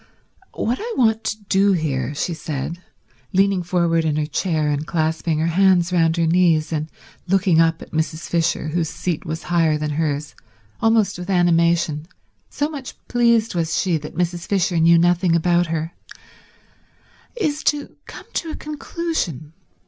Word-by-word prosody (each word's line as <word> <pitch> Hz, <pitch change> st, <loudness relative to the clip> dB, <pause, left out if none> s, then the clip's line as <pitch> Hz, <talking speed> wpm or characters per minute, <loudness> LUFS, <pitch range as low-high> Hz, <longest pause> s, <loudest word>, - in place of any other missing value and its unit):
"What 240 Hz, +3 st, -1 dB
I 465 Hz, +1 st, -4 dB
want 225 Hz, -3 st, +2 dB
to 215 Hz, -1 st, -3 dB
do 200 Hz, 0 st, +3 dB
here," 145 Hz, -5 st, -1 dB
she 170 Hz, -, -2 dB
said, 160 Hz, +1 st, -5 dB, 0.5 s
leaning 195 Hz, 0 st, +3 dB
forward 170 Hz, -2 st, +1 dB
in 155 Hz, -2 st, 0 dB
her 155 Hz, 0 st, 0 dB
chair 155 Hz, -1 st, -1 dB
and 145 Hz, +1 st, -1 dB
clasping 160 Hz, 0 st, 0 dB
her 160 Hz, -, 0 dB
hands 180 Hz, 0 st, +3 dB
round 165 Hz, -1 st, +2 dB
her 165 Hz, -, +2 dB
knees 165 Hz, -2 st, +2 dB
and 155 Hz, 0 st, -2 dB, 0.4 s
looking 185 Hz, -3 st, +3 dB
up 165 Hz, 0 st, +1 dB
at -, -, -15 dB
Mrs. 160 Hz, 0 st, -2 dB
Fisher, 165 Hz, -2 st, 0 dB
whose 165 Hz, 0 st, -1 dB
seat 165 Hz, -1 st, -4 dB
was 160 Hz, +1 st, -4 dB
higher 165 Hz, -3 st, +2 dB
than 150 Hz, 0 st, -3 dB
hers, 150 Hz, -1 st, -2 dB, 0.5 s
almost 220 Hz, -4 st, +2 dB
with 180 Hz, +2 st, -7 dB
animation, 170 Hz, -3 st, +2 dB, 0.4 s
so 290 Hz, -, -1 dB
much 285 Hz, -5 st, -8 dB
pleased 235 Hz, -2 st, +3 dB
was 165 Hz, -2 st, 0 dB
she 180 Hz, -4 st, +1 dB
that 150 Hz, 0 st, -9 dB
Mrs. 175 Hz, -1 st, -2 dB
Fisher 180 Hz, -3 st, +1 dB
knew 170 Hz, +1 st, +6 dB
nothing 175 Hz, 0 st, +3 dB
about 175 Hz, +1 st, +2 dB
her, 165 Hz, 0 st, -3 dB, 1.4 s
"is 310 Hz, -10 st, -1 dB
to 290 Hz, -1 st, 0 dB
come -, -, -10 dB
to 330 Hz, -, -2 dB
a -, -, -4 dB
conclusion. 300 Hz, -, -4 dB
170 Hz, 160 wpm, -21 LUFS, 160-195 Hz, 1.4 s, knew